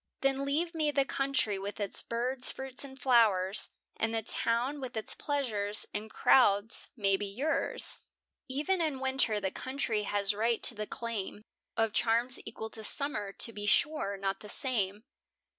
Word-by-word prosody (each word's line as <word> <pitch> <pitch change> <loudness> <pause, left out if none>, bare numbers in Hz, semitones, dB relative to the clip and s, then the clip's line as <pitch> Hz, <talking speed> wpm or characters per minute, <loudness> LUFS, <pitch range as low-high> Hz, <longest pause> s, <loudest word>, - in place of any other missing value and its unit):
Then 275 0 +1
leave 325 +5 -1
me 310 -2 +1
the 280 -2 +2
country 270 -8 0
with 200 +1 -6
its 200 -2 0
birds, 250 +2 0
fruits, 265 0 -3
and 270 -1 -11
flowers, 220 -7 +3 0.3
And 225 0 -1
the 225 - -1
town, 240 +6 +1
with 255 -3 -6
its 220 - +1
pleasures 215 -8 0
and 215 +1 -4
crowds, 215 -2 +3
may 195 -3 +3
be 205 +1 -4
yours. 265 +11 0 0.5
E'en 305 +8 0
in 305 -5 -1
winter 265 -5 +2
the 190 -2 -2
country 260 -4 -2
has 205 0 0
right 225 +2 0
to - - +4
the 215 -1 -5
claim 215 -3 -5 0.3
Of 225 -2 +1
charms 240 +2 +2
equal 220 0 -7
to 220 - -8
summer; 215 -5 +1
to 230 +3 0
be 205 -1 -5
sure, 215 -5 +1
not 195 0 -2
the 210 - -10
same. 210 -6 +1
230 Hz, 165 wpm, -31 LUFS, 205-270 Hz, 0.5 s, to